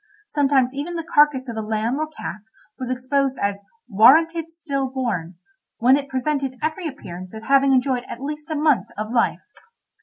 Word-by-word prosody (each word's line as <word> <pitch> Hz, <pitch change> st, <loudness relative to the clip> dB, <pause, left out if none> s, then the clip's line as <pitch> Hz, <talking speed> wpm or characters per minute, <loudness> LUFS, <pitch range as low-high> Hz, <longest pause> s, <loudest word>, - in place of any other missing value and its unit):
Sometimes 275 Hz, -8 st, +2 dB
even 295 Hz, +5 st, -4 dB
the 330 Hz, -, -3 dB
carcase 295 Hz, -4 st, +3 dB
of 235 Hz, -, -5 dB
a -, -, -1 dB
lamb 220 Hz, +5 st, -1 dB
or 310 Hz, -, -1 dB
calf 300 Hz, -9 st, -7 dB, 0.4 s
was 255 Hz, -1 st, -4 dB
exposed 265 Hz, +1 st, 0 dB
as 200 Hz, 0 st, -1 dB, 0.3 s
"warranted 320 Hz, -, +5 dB
still 280 Hz, -5 st, -3 dB
born," 220 Hz, -10 st, -3 dB, 0.4 s
when 255 Hz, +3 st, +5 dB
it 280 Hz, -1 st, -3 dB
presented 265 Hz, 0 st, -2 dB
every 315 Hz, +3 st, -2 dB
appearance 185 Hz, -, -9 dB
of 220 Hz, -, -8 dB
having 275 Hz, +2 st, +4 dB
enjoyed 255 Hz, -1 st, +1 dB
at 235 Hz, -, -6 dB
least 300 Hz, +3 st, -6 dB
a 315 Hz, -, -2 dB
month 300 Hz, -3 st, +2 dB
of 215 Hz, +1 st, -4 dB
life. 240 Hz, -1 st, +1 dB
270 Hz, 175 wpm, -22 LUFS, 235-300 Hz, 0.4 s, warranted